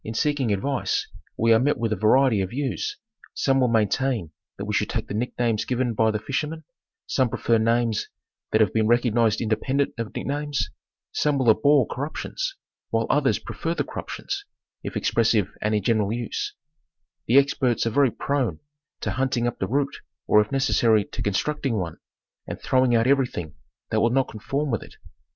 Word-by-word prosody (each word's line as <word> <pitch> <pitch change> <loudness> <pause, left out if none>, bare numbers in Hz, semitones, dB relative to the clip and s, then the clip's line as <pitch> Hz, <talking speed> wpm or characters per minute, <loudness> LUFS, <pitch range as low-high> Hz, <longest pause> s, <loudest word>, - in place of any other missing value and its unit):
In 110 - -6
seeking 140 -2 +1
advice 130 +7 -1 0.3
we 115 +1 +4
are 110 - +5
met 145 +4 +2
with 115 -2 0
a - - 0
variety 110 +2 +4
of 95 - -2
views; 145 - -3 0.4
some 135 -1 +2
will 130 - +4
maintain 110 - +1 0.3
that - - -5
we - - -3
should - - +1
take - - -2
the - - -5
nick 120 +4 -3
names 115 -3 +1
given 125 -1 -1
by 110 +1 +3
the 110 - 0
fish 120 +6 -2
ermen; 160 +1 -6 0.4
some 130 -3 +1
prefer 115 0 +1
names 115 0 +1 0.4
that 110 - +3
have 105 - +3
been 110 -1 +2
recognized 120 -2 +2
independ 120 +5 0
ent 140 - -1
of 115 -2 -5
nick - - -4
names; 145 0 -2 0.4
some 150 -1 +1
will 125 -4 +5
abhor 140 +4 +4
corruptions, - - -4 0.3
while - - +1
others - - +2
prefer - - -4
the - - 0
corruptions, 400 0 -5 0.4
if - - -5
expressive 110 -4 +2
and 105 0 +1
in 105 - 0
general 110 -2 +1
use: 120 0 -3 0.7
The 125 - +5
ex 140 0 +5
perts 120 -4 +1
are 115 - 0
very 140 +3 +4
prone 135 +1 -1 0.4
to - - -2
hunting 130 -2 0
up 120 - -2
the 95 - -1
root, 140 +4 0 0.3
or, 105 - +5
if 105 - -4
necessary, 120 -6 +3
to - - -7
constructing 135 +5 -1
one, 85 -5 -3 0.5
and - - -5
throwing 130 -2 +2
out 115 0 +3
everything 125 - +1 0.4
that - - +2
will 115 - +4
not 135 +2 +1
con 110 - -9
form 140 +6 -2
with 115 - -1
it. - - -13
120 Hz, 190 wpm, -24 LUFS, 110-135 Hz, 0.7 s, are